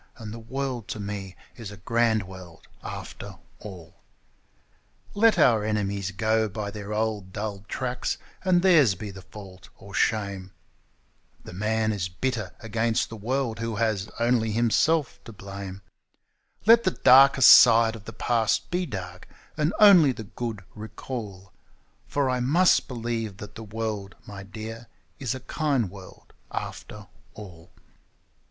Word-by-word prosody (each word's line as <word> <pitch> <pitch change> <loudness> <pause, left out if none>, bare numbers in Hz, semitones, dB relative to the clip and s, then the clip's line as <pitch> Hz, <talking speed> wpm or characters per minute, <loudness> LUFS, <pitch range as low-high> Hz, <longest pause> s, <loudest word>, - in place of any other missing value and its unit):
and 110 -2 -8
the 115 - -8
world 130 -1 -4
to 110 - -5
me 100 -2 -6 0.2
is 115 -4 -7
a 100 - -10
grand 115 +1 +1
world 90 -3 -12 0.2
after - - -8 0.2
all! 90 -6 -11 1.2
Let 225 +2 +4
our 110 -4 +4
enemies 100 -3 -1
go 110 +2 0
by 100 0 -5
their 105 0 -7
old 105 -3 -2
dull 100 -1 -5
tracks, 125 -1 -3 0.3
and 180 -2 +3
theirs 155 - +5
be 105 +2 -7
the 95 -1 -11
fault 95 -1 -13
or 100 0 -13
shame 100 -3 -1 0.9
(The - - -10
man 110 +3 0
is 90 -3 -3
bitter 110 +1 -3
against 115 0 0
the 115 - -8
world 115 +1 -2
who 115 -1 -3
has 105 -2 -1
only 115 -2 +2
himself 120 +6 +1
to 115 - -9
blame); 100 -1 -8 0.8
Let 230 +2 +7
the - - +3
darkest 135 0 +7
side 115 -1 +7
of 105 -2 -12
the - - -7
past 115 -1 0
be 180 0 -1
dark, 90 - -7 0.3
and 150 +2 +1
only 180 -10 +7
the 110 - -8
good 110 0 -6
recall; 105 -3 -8 0.6
For 140 -2 0
I 125 -1 0
must 160 +9 +3
believe 115 -5 -4
that 105 0 -10
the 115 - -9
world, 105 -3 -5
my 100 -1 -9
dear, 110 +3 -8 0.3
is 130 -2 -2
a 130 - -8
kind 130 - -1
world 95 -2 -14 0.2
after 105 -1 -7 0.3
all. 90 -5 -12
110 Hz, 145 wpm, -26 LUFS, 100-120 Hz, 1.2 s, Let